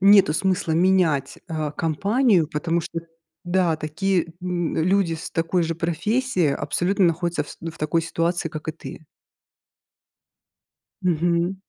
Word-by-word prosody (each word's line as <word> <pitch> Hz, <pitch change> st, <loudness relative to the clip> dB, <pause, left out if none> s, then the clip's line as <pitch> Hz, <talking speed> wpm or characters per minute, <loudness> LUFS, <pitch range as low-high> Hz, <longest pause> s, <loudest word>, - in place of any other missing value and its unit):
нету 195 Hz, -5 st, +6 dB
смысла 185 Hz, -1 st, 0 dB
менять, 165 Hz, -5 st, +2 dB
э, 155 Hz, -2 st, -2 dB
компанию, 195 Hz, -, +2 dB
потому 165 Hz, +3 st, -1 dB
что, 165 Hz, +1 st, -5 dB, 0.4 s
да, 175 Hz, -2 st, +2 dB
такие, 170 Hz, +3 st, 0 dB
м, 180 Hz, -2 st, -2 dB
люди 180 Hz, 0 st, +2 dB
с 160 Hz, -, -7 dB
такой 165 Hz, +2 st, 0 dB
же 165 Hz, 0 st, -1 dB
профессией 175 Hz, -, 0 dB
абсолютно 190 Hz, +6 st, 0 dB
находятся, 170 Hz, +1 st, 0 dB
фс -, -, -11 dB
ну, 165 Hz, -, -5 dB
в 165 Hz, -, -16 dB
такой 155 Hz, +2 st, 0 dB
ситуации, 165 Hz, +1 st, -1 dB
как 155 Hz, 0 st, -7 dB
и -, -, 0 dB
ты. 160 Hz, 0 st, -10 dB, 2.0 s
Мгм. 175 Hz, +1 st, +1 dB
170 Hz, 135 wpm, -23 LUFS, 160-185 Hz, 2.0 s, нету